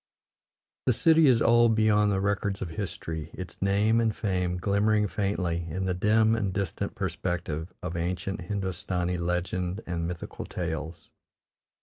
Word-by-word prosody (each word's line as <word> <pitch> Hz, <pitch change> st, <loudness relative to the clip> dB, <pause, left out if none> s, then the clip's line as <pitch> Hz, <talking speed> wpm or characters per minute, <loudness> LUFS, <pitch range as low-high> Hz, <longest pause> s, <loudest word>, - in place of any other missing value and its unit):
The 125 Hz, -, +5 dB
city 160 Hz, +5 st, +5 dB
is 120 Hz, -3 st, +5 dB
old 120 Hz, -1 st, +5 dB
beyond 105 Hz, -1 st, +4 dB
the 95 Hz, -, +1 dB
records 100 Hz, 0 st, 0 dB
of 90 Hz, -, -4 dB
history, 80 Hz, -4 st, -5 dB
its 90 Hz, -2 st, -8 dB
name 105 Hz, +4 st, +3 dB
and 110 Hz, -2 st, +1 dB
fame 90 Hz, -3 st, -1 dB
glimmering 105 Hz, +3 st, +2 dB
faintly 90 Hz, -3 st, -1 dB
in 95 Hz, +4 st, -2 dB
the 95 Hz, -, 0 dB
dim 110 Hz, +4 st, +3 dB
and 100 Hz, -4 st, -1 dB
distant 95 Hz, -3 st, -3 dB
perspective 85 Hz, -2 st, -3 dB
of 90 Hz, -1 st, -4 dB
ancient 90 Hz, +3 st, -2 dB
Hindostani 90 Hz, -2 st, -2 dB
legend 90 Hz, +2 st, -2 dB
and 85 Hz, -1 st, -2 dB
mythical 85 Hz, -1 st, -6 dB
tales. 80 Hz, -2 st, -5 dB
95 Hz, 140 wpm, -28 LUFS, 85-105 Hz, -, The